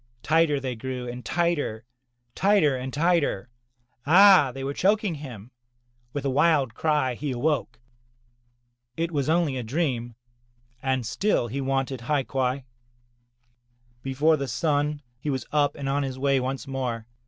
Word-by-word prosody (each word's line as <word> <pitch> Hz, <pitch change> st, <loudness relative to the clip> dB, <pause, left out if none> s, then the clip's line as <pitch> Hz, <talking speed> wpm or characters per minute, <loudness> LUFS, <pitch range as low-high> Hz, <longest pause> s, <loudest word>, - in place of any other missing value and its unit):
Tighter 160 Hz, -2 st, +3 dB
they 130 Hz, -2 st, -4 dB
grew 125 Hz, +1 st, -5 dB
and 125 Hz, +1 st, -6 dB
tighter, 160 Hz, -10 st, -1 dB, 0.5 s
tighter 190 Hz, -8 st, +3 dB
and 130 Hz, +1 st, -5 dB
tighter. 150 Hz, -, +1 dB, 0.5 s
Ah! 180 Hz, -1 st, +7 dB
they 135 Hz, +1 st, -7 dB
were 140 Hz, +1 st, -2 dB
choking 205 Hz, +2 st, +1 dB
him. 125 Hz, -7 st, -9 dB, 0.6 s
With 145 Hz, +1 st, -4 dB
a -, -, +2 dB
wild 140 Hz, -4 st, +3 dB
cry, 150 Hz, -2 st, +1 dB
he 140 Hz, +3 st, -4 dB
awoke. 125 Hz, -3 st, -1 dB, 1.2 s
It 165 Hz, +1 st, -1 dB
was 145 Hz, -2 st, -1 dB
only 160 Hz, -5 st, +2 dB
a 125 Hz, -, -3 dB
dream, 120 Hz, -3 st, -2 dB, 0.7 s
and 130 Hz, -2 st, -1 dB
still 155 Hz, -, 0 dB
he 140 Hz, +5 st, -3 dB
wanted 135 Hz, -1 st, -1 dB
hai 140 Hz, +2 st, 0 dB
quai. 130 Hz, 0 st, -1 dB, 1.4 s
Before 140 Hz, +5 st, +2 dB
the 140 Hz, -1 st, -3 dB
sun, 145 Hz, +3 st, 0 dB, 0.2 s
he 150 Hz, -, -4 dB
was 130 Hz, -2 st, -2 dB
up 145 Hz, -2 st, +2 dB
and 140 Hz, -, -5 dB
on 140 Hz, +1 st, +1 dB
his 135 Hz, -2 st, -4 dB
way 135 Hz, 0 st, +2 dB
once 130 Hz, -1 st, -3 dB
more. 125 Hz, -4 st, -3 dB
135 Hz, 145 wpm, -25 LUFS, 130-155 Hz, 1.4 s, Ah